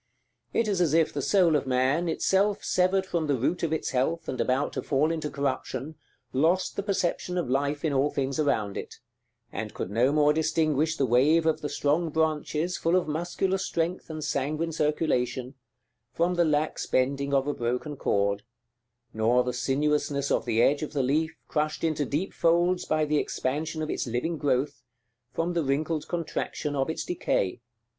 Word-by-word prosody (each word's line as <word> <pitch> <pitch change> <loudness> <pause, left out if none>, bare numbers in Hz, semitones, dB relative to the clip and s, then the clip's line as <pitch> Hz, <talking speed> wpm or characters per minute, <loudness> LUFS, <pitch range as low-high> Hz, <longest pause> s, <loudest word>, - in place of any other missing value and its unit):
It 230 - +1
is 195 -3 +1
as 160 -3 +2
if 165 -1 +3
the 145 - -2
soul 175 -1 +3
of 140 -2 0
man, 135 +7 +1
itself 195 +5 +1
severed 185 +1 +2
from 170 -4 -1
the 145 - +2
root 130 +8 -1
of 165 - -1
its 160 - -1
health, 140 +6 0
and 130 - -2
about 130 +3 0
to - - -2
fall 150 +3 +1
into 160 -2 -2
corruption, 140 0 -3 0.4
lost 165 +8 +2
the - - -1
perception 180 -2 -1
of 170 -8 -1
life 140 +3 0
in 150 - +1
all 140 +2 +2
things 135 -1 -2
around 110 -9 0
it; - - -6 0.6
and - - -5
could 90 - -4
no 120 +6 +3
more 150 0 +4
distinguish 160 0 +1
the 135 - +2
wave 140 +7 +4
of 160 - +1
the 150 - -3
strong 145 +4 +1
branches, 155 +2 0
full 165 +2 +1
of 185 -3 +2
muscular 175 +5 -1
strength 175 -1 -2
and 155 -1 -5
sanguine 150 +3 -1
circulation, 135 -5 0 0.6
from 170 +2 +1
the 175 -1 +3
lax 155 0 0
bending 140 +2 0
of 135 -1 +2
a 145 - -1
broken 125 +5 -2
cord, 100 -5 0 0.7
nor 115 +3 +3
the 125 0 -2
sinuousness 140 +2 0
of - - +1
the 115 +1 +2
edge 145 +2 +3
of 155 - -5
the 140 -3 +1
leaf, 160 +5 0
crushed 150 0 -1
into 155 -3 +1
deep 155 +9 -2
folds 175 +2 +2
by 155 0 +1
the 150 0 +1
expansion 155 +4 -2
of 155 - -4
its - - -2
living 135 +8 -2
growth, 140 0 0 0.5
from 170 +2 -1
the 170 - +1
wrinkled 150 +3 -1
contraction 160 -3 -3
of 135 +2 0
its 160 - -3
decay. 115 - -1
150 Hz, 180 wpm, -27 LUFS, 135-165 Hz, 0.7 s, more